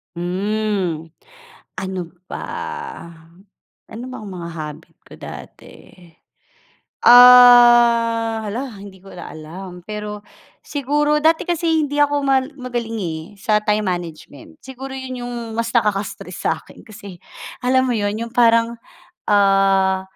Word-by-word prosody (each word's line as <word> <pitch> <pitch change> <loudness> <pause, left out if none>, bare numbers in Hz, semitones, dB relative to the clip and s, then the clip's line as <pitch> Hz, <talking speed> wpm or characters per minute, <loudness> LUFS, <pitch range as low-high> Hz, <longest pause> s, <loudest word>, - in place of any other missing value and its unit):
Hmm, 185 -2 -2 0.7
ano 190 0 -4 0.2
ba? - - -7 1.5
Ano 235 +3 -7
bang 255 -4 -8
mga 170 -1 -7
habit 155 +1 -9
ko - - -18
dati? - - -11 1.3
Ah, 240 -2 +7
hala 245 +6 -4
hindi 195 -2 -13
ko 195 - -14
na 180 - -9
alam, 175 +3 -10
pero 210 0 -7 0.4
siguro 295 +1 0
dati 320 +1 +2
kasi 330 -2 0
hindi 290 0 -3
ako 290 0 +2
mal 270 +1 0
magaling, 240 -4 -5
eh, 160 -3 -4 0.2
sa 210 +1 +1
time 210 0 +1
management 165 -6 -6
siguro 265 +1 -9
yun 255 -2 -6
yung 245 - -6 0.2
mas 230 0 -1
nakaka-stress 210 -3 -1
sa - - +2
akin - - -17
kasi 200 -4 -11 0.5
alam 260 0 +3
mo 245 - 0
yun 205 -1 -1
yung 235 - -11
parang, 230 -1 +3 0.5
ah, 195 -1 +3
220 Hz, 120 wpm, -19 LUFS, 190-250 Hz, 1.5 s, Ah